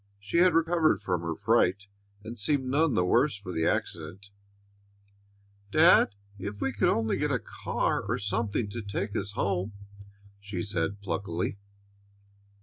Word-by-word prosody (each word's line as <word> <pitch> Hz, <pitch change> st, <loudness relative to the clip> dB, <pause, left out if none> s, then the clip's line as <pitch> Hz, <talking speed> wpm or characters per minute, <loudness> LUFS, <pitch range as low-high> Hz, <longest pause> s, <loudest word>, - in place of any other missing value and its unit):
She 100 Hz, +10 st, -3 dB
had 180 Hz, -1 st, +5 dB
recovered 165 Hz, -1 st, +3 dB
from 90 Hz, -5 st, -2 dB
her 85 Hz, -1 st, -3 dB
fright, 100 Hz, +5 st, +2 dB, 0.4 s
and 115 Hz, +1 st, -8 dB
seemed 135 Hz, +6 st, +1 dB
none 145 Hz, +3 st, +2 dB
the 90 Hz, -, +2 dB
worse 120 Hz, +7 st, +3 dB
for 100 Hz, -2 st, -8 dB
the 80 Hz, -2 st, 0 dB
accident. 100 Hz, +3 st, -3 dB, 1.4 s
"Dad, 100 Hz, 0 st, +5 dB, 0.2 s
if 100 Hz, +2 st, -6 dB
we 135 Hz, -, -1 dB
could 105 Hz, -, +2 dB
only 110 Hz, -1 st, +1 dB
get -, -, 0 dB
a -, -, +2 dB
car -, -, -2 dB
or -, -, 0 dB
something 105 Hz, +2 st, -1 dB
to 120 Hz, -, -5 dB
take 100 Hz, 0 st, -4 dB
us 100 Hz, -, -2 dB
home," 95 Hz, 0 st, -1 dB, 0.7 s
she 100 Hz, -3 st, -5 dB
said 100 Hz, 0 st, -2 dB
pluckily. 95 Hz, 0 st, -3 dB
100 Hz, 145 wpm, -28 LUFS, 95-120 Hz, 1.4 s, had